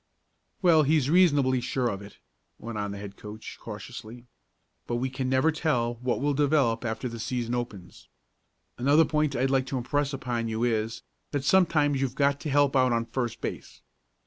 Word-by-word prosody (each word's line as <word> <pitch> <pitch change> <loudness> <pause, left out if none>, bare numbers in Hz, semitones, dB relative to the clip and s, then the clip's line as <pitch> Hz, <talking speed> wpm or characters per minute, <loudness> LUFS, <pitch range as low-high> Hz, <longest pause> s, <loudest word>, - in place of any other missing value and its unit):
"Well, 165 -3 +6
he's 150 -1 +2
reasonably 145 -8 +4
sure 125 0 -1
of 100 -4 -3
it," 100 0 -12 0.4
went 115 -2 -6
on 105 0 -2
the 100 - -6
head 100 -1 -8
coach 105 +1 -9
cautiously. 110 +2 -9 0.6
"But 120 - -1
we 130 +2 -1
never 130 +4 +2
can 160 - -8
tell 120 -7 +1
what 125 -1 0
will 145 +1 +1
develop 140 -5 +2
after 115 +2 -3
the 115 -1 -7
season 120 0 -2
opens. 105 -7 -6 0.7
Another 145 +6 +5
point 150 -2 0
I'd 130 +1 +1
like 130 -1 +1
to 130 - -2
impress 140 +3 -1
on 120 -3 -2
you 110 +1 -2
is, 115 -1 -1 0.3
that 145 -2 -2
sometimes 150 -5 +3
you've 135 -2 -1
got 140 0 +2
to 155 - -4
help 145 -1 +3
out 130 -1 +4
on 115 0 0
first 120 0 -3
base. - - -6
130 Hz, 180 wpm, -27 LUFS, 115-145 Hz, 0.7 s, Well